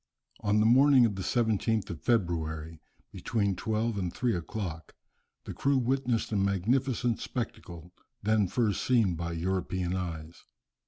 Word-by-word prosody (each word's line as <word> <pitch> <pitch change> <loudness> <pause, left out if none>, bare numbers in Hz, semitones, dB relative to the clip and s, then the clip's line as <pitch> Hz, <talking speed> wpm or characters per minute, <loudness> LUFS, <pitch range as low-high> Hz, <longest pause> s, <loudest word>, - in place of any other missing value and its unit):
On 105 +1 +1
the 105 - +3
morning 130 +2 +6
of 110 - 0
the 95 - -5
17th 110 0 0
of 80 - -7
February, 80 -7 -1 0.3
between 100 -4 -1
twelve 110 +2 -1
and 90 -3 -2
three 120 +5 0
o'clock, 85 -2 -5 0.5
the - - -7
crew 140 0 +1
witnessed 125 -2 0
a - - -1
magnificent 115 +5 +1
spectacle, 90 -8 -6 0.3
then 105 -1 +2
first 105 0 0
seen 115 -8 +3
by 85 0 -4
European 90 +1 -2
eyes. 85 -3 -6
105 Hz, 140 wpm, -29 LUFS, 85-115 Hz, 0.5 s, morning